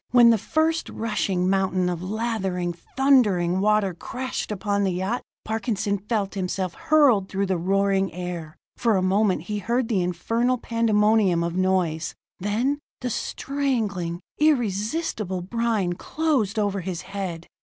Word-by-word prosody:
When 240 Hz, -1 st, +7 dB
the 225 Hz, -, +3 dB
first 320 Hz, +7 st, 0 dB
rushing 200 Hz, -5 st, -1 dB
mountain 190 Hz, -1 st, +1 dB
of 175 Hz, -1 st, -2 dB
lathering, 190 Hz, -4 st, -2 dB, 0.2 s
thundering 205 Hz, -10 st, +4 dB
water 210 Hz, -1 st, +2 dB
crashed 255 Hz, +7 st, -4 dB
upon 200 Hz, 0 st, 0 dB
the 190 Hz, -2 st, +1 dB
yacht, 190 Hz, +7 st, -1 dB, 0.2 s
Parkinson 215 Hz, -2 st, -1 dB
felt 205 Hz, -1 st, -2 dB
himself 185 Hz, -1 st, -2 dB
hurtling 265 Hz, -, +4 dB
through 195 Hz, +1 st, -1 dB
the 190 Hz, -2 st, 0 dB
roaring 195 Hz, +1 st, +1 dB
air. 175 Hz, -3 st, -6 dB, 0.2 s
For 230 Hz, -4 st, +2 dB
a 185 Hz, -, +1 dB
moment 190 Hz, -3 st, +2 dB
he 210 Hz, +3 st, -3 dB
heard 235 Hz, +3 st, 0 dB
the 200 Hz, -5 st, +2 dB
infernal 230 Hz, +8 st, 0 dB
pandemonium 215 Hz, -6 st, +2 dB
of 170 Hz, 0 st, -2 dB
noise... 180 Hz, -4 st, 0 dB, 0.2 s
then 230 Hz, +9 st, 0 dB, 0.2 s
the 250 Hz, 0 st, -2 dB
strangling, 215 Hz, -13 st, -2 dB, 0.2 s
irresistible 220 Hz, -, 0 dB
brine 220 Hz, -3 st, 0 dB
closed 260 Hz, -, -1 dB
over 200 Hz, -2 st, 0 dB
his 175 Hz, -1 st, -4 dB
head. 190 Hz, -4 st, -5 dB
200 Hz, 135 wpm, -24 LUFS, 185-230 Hz, 0.2 s, When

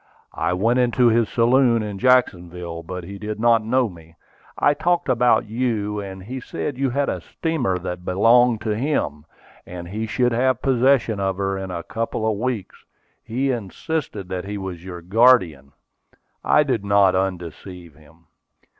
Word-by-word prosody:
"I -, -, -1 dB
went 115 Hz, +7 st, +1 dB
into 125 Hz, 0 st, +3 dB
his 115 Hz, -1 st, +2 dB
saloon 120 Hz, -1 st, +3 dB
in 105 Hz, -2 st, -6 dB
Jacksonville, 90 Hz, -9 st, +1 dB
but 90 Hz, +2 st, -7 dB
he 100 Hz, +3 st, -9 dB
did 105 Hz, 0 st, -5 dB
not 115 Hz, -1 st, +3 dB
know 125 Hz, +3 st, +1 dB
me. 80 Hz, -4 st, -14 dB, 0.4 s
I 145 Hz, -, +3 dB
talked 175 Hz, +3 st, 0 dB
about 125 Hz, -2 st, +3 dB
you; 110 Hz, -2 st, -2 dB
and 95 Hz, -2 st, -8 dB
he 130 Hz, +6 st, -6 dB
said 130 Hz, +3 st, -5 dB
you 135 Hz, +1 st, 0 dB
had 140 Hz, +3 st, 0 dB
a -, -, -3 dB
steamer 145 Hz, -, -2 dB
that 90 Hz, 0 st, -6 dB
belonged 115 Hz, +5 st, +3 dB
to 105 Hz, -1 st, -1 dB
him, 110 Hz, -, -2 dB, 0.4 s
and 85 Hz, -1 st, -9 dB
he 110 Hz, +3 st, -4 dB
should 125 Hz, +2 st, +1 dB
have 130 Hz, +1 st, +1 dB
possession 130 Hz, -4 st, +2 dB
of 95 Hz, -1 st, -1 dB
her 95 Hz, 0 st, -1 dB
in 95 Hz, -1 st, -5 dB
a 85 Hz, -2 st, -5 dB
couple 115 Hz, +1 st, -3 dB
of 105 Hz, -2 st, -1 dB
weeks. 120 Hz, -4 st, -4 dB, 0.4 s
He 130 Hz, +4 st, -1 dB
insisted 115 Hz, -, -4 dB
that 90 Hz, -1 st, -4 dB
he 105 Hz, +1 st, -5 dB
was 95 Hz, -3 st, -6 dB
your 90 Hz, -2 st, -8 dB
guardian. 90 Hz, -, +3 dB, 0.7 s
I 150 Hz, -, +4 dB
did 125 Hz, -7 st, -1 dB
not 100 Hz, -2 st, +4 dB
undeceive 90 Hz, -2 st, -4 dB
him." 80 Hz, +3 st, -22 dB
105 Hz, 165 wpm, -22 LUFS, 90-125 Hz, 0.7 s, I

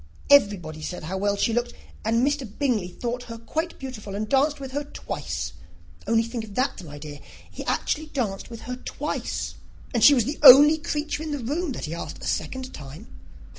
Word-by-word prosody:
Everybody 185 Hz, -, +4 dB
said 180 Hz, +2 st, -5 dB
how 185 Hz, +5 st, -3 dB
well 205 Hz, +1 st, +1 dB
she 225 Hz, -, +1 dB
looked; 240 Hz, +1 st, -1 dB, 0.3 s
and 230 Hz, +3 st, +2 dB
Mr. 285 Hz, -4 st, -1 dB
Bingley 240 Hz, -10 st, +1 dB
thought 245 Hz, +6 st, -4 dB
her 230 Hz, -, -6 dB
quite 320 Hz, +9 st, -3 dB
beautiful, 220 Hz, -7 st, -7 dB
and 215 Hz, +1 st, -2 dB
danced 280 Hz, +4 st, +2 dB
with 270 Hz, -1 st, -7 dB
her 290 Hz, +2 st, -2 dB
twice. 285 Hz, -, -5 dB, 0.5 s
Only 225 Hz, 0 st, +3 dB
think 230 Hz, 0 st, -4 dB
of 210 Hz, -2 st, -10 dB
that, 255 Hz, -6 st, 0 dB
my 145 Hz, -3 st, -9 dB
dear: 145 Hz, -1 st, -8 dB, 0.3 s
he -, -, -7 dB
actually 310 Hz, 0 st, -1 dB
danced 230 Hz, -10 st, -3 dB
with 230 Hz, -1 st, -9 dB
her 250 Hz, 0 st, -5 dB
twice; -, -, -4 dB, 0.4 s
and 235 Hz, -3 st, +1 dB
she 285 Hz, +4 st, +9 dB
was 240 Hz, -5 st, +2 dB
the 290 Hz, +4 st, -4 dB
only 295 Hz, +3 st, +10 dB
creature 300 Hz, 0 st, -2 dB
in 315 Hz, -, -4 dB
the 295 Hz, -, -2 dB
room 295 Hz, +5 st, -2 dB
that -, -, -5 dB
he 155 Hz, -, -5 dB
asked 170 Hz, -, -6 dB
a -, -, -10 dB
second 260 Hz, 0 st, -3 dB
time. 150 Hz, -, -10 dB
240 Hz, 200 wpm, -25 LUFS, 205-285 Hz, 0.5 s, only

